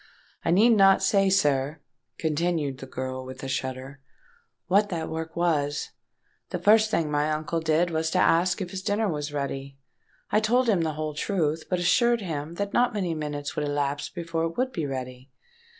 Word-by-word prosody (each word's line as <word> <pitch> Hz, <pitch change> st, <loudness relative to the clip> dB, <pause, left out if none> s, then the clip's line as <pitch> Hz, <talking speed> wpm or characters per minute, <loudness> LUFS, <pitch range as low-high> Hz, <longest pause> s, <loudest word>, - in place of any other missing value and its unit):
I -, -, -1 dB
need 210 Hz, +8 st, +5 dB
not 195 Hz, -3 st, +5 dB
say, 195 Hz, 0 st, +3 dB
sir," 145 Hz, -5 st, +1 dB, 0.4 s
continued 155 Hz, -3 st, -1 dB
the 135 Hz, -, -8 dB
girl, 130 Hz, 0 st, -5 dB
with 130 Hz, +1 st, -9 dB
a -, -, -3 dB
shudder, 130 Hz, +1 st, -4 dB, 0.7 s
"what 205 Hz, +2 st, +3 dB
that 165 Hz, -4 st, -3 dB
work 160 Hz, 0 st, -5 dB
was. 150 Hz, -4 st, 0 dB, 0.6 s
The -, -, -2 dB
first 215 Hz, +1 st, +4 dB
thing 165 Hz, -8 st, 0 dB
my 145 Hz, +1 st, +1 dB
uncle 155 Hz, +2 st, -1 dB
did 160 Hz, +2 st, +1 dB
was 160 Hz, 0 st, 0 dB
to -, -, -1 dB
ask 180 Hz, +4 st, +3 dB
if 180 Hz, -2 st, -4 dB
his 190 Hz, -, -5 dB
dinner 210 Hz, +2 st, 0 dB
was 150 Hz, -4 st, -3 dB
ready? 140 Hz, -1 st, -4 dB, 0.5 s
I -, -, +4 dB
told 240 Hz, +4 st, +2 dB
him 200 Hz, -6 st, +3 dB
the 160 Hz, -1 st, -1 dB
whole 155 Hz, 0 st, -4 dB
truth, 160 Hz, -1 st, -1 dB
but 180 Hz, -, +1 dB
assured 235 Hz, +6 st, +3 dB
him 160 Hz, -3 st, -4 dB
that 200 Hz, +2 st, -3 dB
not 245 Hz, -1 st, +2 dB
many 185 Hz, -5 st, -1 dB
minutes 150 Hz, -2 st, -4 dB
would 150 Hz, -, -1 dB
elapse 145 Hz, 0 st, -1 dB
before 165 Hz, -2 st, -3 dB
it 165 Hz, -, -5 dB
would 260 Hz, +1 st, 0 dB
be 160 Hz, -, -3 dB
ready. 130 Hz, -1 st, -6 dB
160 Hz, 185 wpm, -26 LUFS, 145-190 Hz, 0.7 s, need